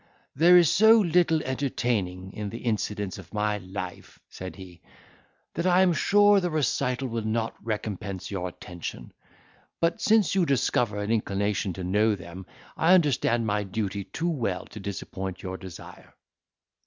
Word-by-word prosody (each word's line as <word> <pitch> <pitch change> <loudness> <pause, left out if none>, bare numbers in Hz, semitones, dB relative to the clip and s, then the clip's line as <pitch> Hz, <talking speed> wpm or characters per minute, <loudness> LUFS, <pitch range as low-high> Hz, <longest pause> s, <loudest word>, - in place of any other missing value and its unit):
"There 175 +5 +7
is 170 -4 +5
so 220 +2 +7
little 170 -4 +2
entertaining 115 -9 -2
in 105 -1 -5
the 115 - -6
incidents 105 -4 -2
of - - -12
my 105 0 0
life," 95 -1 -8
said 95 0 -8
he, 90 -3 -12 0.7
"that 170 +3 -1
I 180 +1 +5
am 180 -2 +3
sure 205 +5 +5
the 180 -2 -1
recital 135 -4 0
will 115 -1 -3
not 110 +1 -2
recompense 105 -3 -4
your 90 -2 -3
attention; 90 0 -8 0.7
but, 165 0 0
since 215 -2 +3
you 190 -1 +3
discover 125 -7 +1
an 105 +1 -2
inclination 100 -3 0
to 95 - -6
know 105 +4 +2
them 90 0 -10 0.3
I 175 +3 +5
understand 130 -8 +2
my 105 -1 0
duty 100 0 -3
too 170 +1 -2
well 115 - -2
to 110 - -8
disappoint 95 -1 -6
your 95 -1 -4
desire. 95 -3 -12
110 Hz, 155 wpm, -26 LUFS, 95-155 Hz, 0.7 s, There